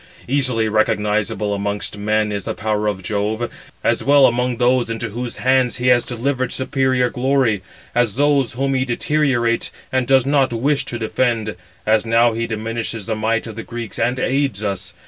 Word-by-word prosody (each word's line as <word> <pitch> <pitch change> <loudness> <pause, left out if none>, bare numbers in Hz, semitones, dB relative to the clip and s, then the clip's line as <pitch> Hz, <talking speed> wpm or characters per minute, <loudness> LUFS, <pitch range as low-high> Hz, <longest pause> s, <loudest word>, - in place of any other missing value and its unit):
Easily 125 -4 +1
recognizable 105 -1 0
amongst 100 +1 -2
men 105 +1 0
is 100 -2 -4
the - - -3
power 105 0 -1
of 100 -3 -2
Jove, 105 +4 -2 0.3
as - - +1
well 140 0 +6
among 125 0 +1
those 125 0 +2
into 115 -1 -3
whose 120 +2 -5
hands 130 -1 +2
he 125 +1 +1
has 120 -1 +5
delivered 130 +1 -2
superior 130 -1 +1
glory, 130 -5 +1 0.3
as 120 -4 +1
those 140 -2 +2
whom 135 +2 -1
he 130 -1 +1
deteriorates, 120 -2 0 0.2
and 130 -2 0
does 135 -2 +4
not 140 -2 +2
wish 135 +5 0
to 120 - -4
defend. 115 -1 -1 0.3
As 110 0 +3
now 115 0 +3
he 115 +1 -2
diminishes 115 -1 -4
the 110 - -2
might 110 +1 0
of 110 -2 -8
the 115 - -5
Greeks, 115 -2 -7
and 125 +1 0
aids 130 -6 0
us. 95 -3 -4
120 Hz, 175 wpm, -20 LUFS, 110-130 Hz, 0.3 s, well